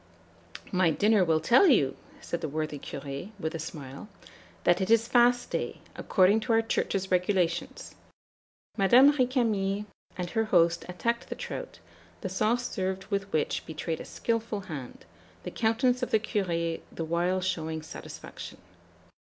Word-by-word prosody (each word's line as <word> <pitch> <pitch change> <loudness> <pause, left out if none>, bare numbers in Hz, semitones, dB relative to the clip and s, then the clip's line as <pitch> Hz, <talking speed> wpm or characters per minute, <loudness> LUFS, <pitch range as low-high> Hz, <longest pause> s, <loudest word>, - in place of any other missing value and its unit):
"'My 185 -2 +3
dinner 205 +4 +3
will 160 -2 +2
tell 240 - +5
you,' 150 - +4 0.3
said 170 - -4
the 155 - -3
worthy 155 0 -3
Curé, 140 +7 -6
with 160 -2 -3
a 165 - -4
smile, 145 +2 -8 0.5
'that 175 +2 +3
it 190 - -1
is 230 0 +4
fast 245 0 +3
day, - - -3 0.2
according 195 +3 +3
to 230 +1 -1
our 225 0 +4
Church's 195 -4 -1
regulations.' 180 -2 0 0.8
Madame 250 +9 +6
Récamier 225 -7 +1 0.3
and 180 -1 -4
her 225 -1 +1
host 170 -4 +3
attacked 235 +6 -2
the - - -4
trout, - - -6 0.4
the 190 - -3
sauce 220 +6 +1
served 190 0 -3
with 195 0 -2
which 155 - 0
betrayed 160 +1 -4
a - - -7
skilful 230 -3 -2
hand, 145 -9 -8 0.4
the - - -5
countenance 245 +3 +1
of 250 - -1
the 220 - +3
Curé 170 -6 -1
the 165 - -4
while 175 +3 +1
showing 160 -4 -2
satisfaction. - - -9
190 Hz, 150 wpm, -28 LUFS, 165-225 Hz, 0.8 s, Madame